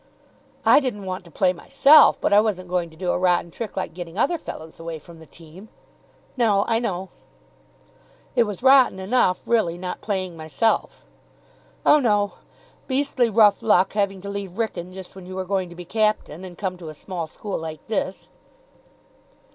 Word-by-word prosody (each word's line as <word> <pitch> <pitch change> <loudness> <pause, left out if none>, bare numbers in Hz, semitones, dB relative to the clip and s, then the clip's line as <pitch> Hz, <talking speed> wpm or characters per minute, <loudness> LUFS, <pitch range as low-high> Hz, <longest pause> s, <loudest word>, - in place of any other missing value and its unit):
"I - - +7
didn't 240 -8 -4
want 185 0 -5
to - - -14
play 180 +3 +1
myself, 275 - +5
but - - +1
I 205 - +7
wasn't 185 -5 -2
going 175 -2 -1
to 160 - -18
do 180 0 -1
a - - -1
rotten 180 -2 +1
trick 220 +3 -7
like 190 - -3
getting 175 0 -8
other 320 +9 +1
fellows 160 - -9
away 165 -1 -6
from 165 +2 -15
the 160 - -14
team." 170 +8 -15 0.7
"No, 215 -5 +2
I 225 -1 +2
know." 190 -5 -3 1.3
"It 240 -2 +4
was 210 +2 -6
rotten 265 -6 +6
enough, 190 -2 +1
really, 195 -8 +1
not 180 0 -6
playing 185 -4 -3
myself." 160 +7 -1 0.8
"Oh, 300 - +6
no. 210 -6 +2 0.6
Beastly 260 -3 +1
rough 215 -1 +4
luck 205 -4 +3
having 200 -2 -1
to 200 - -7
leave 200 -2 -6
Wrykyn 185 -6 -3
just 190 0 -10
when 185 -2 -11
you 185 - -8
were 190 0 -3
going 190 -1 -1
to 175 - -12
be 175 0 -9
captain, 210 -5 -1
and 180 -2 -10
come 185 -3 -3
to 170 -3 -9
a 155 - -9
small 170 +1 -5
school 200 +5 -5
like 160 -1 -7
this." 200 -3 -3
190 Hz, 180 wpm, -23 LUFS, 175-215 Hz, 1.3 s, I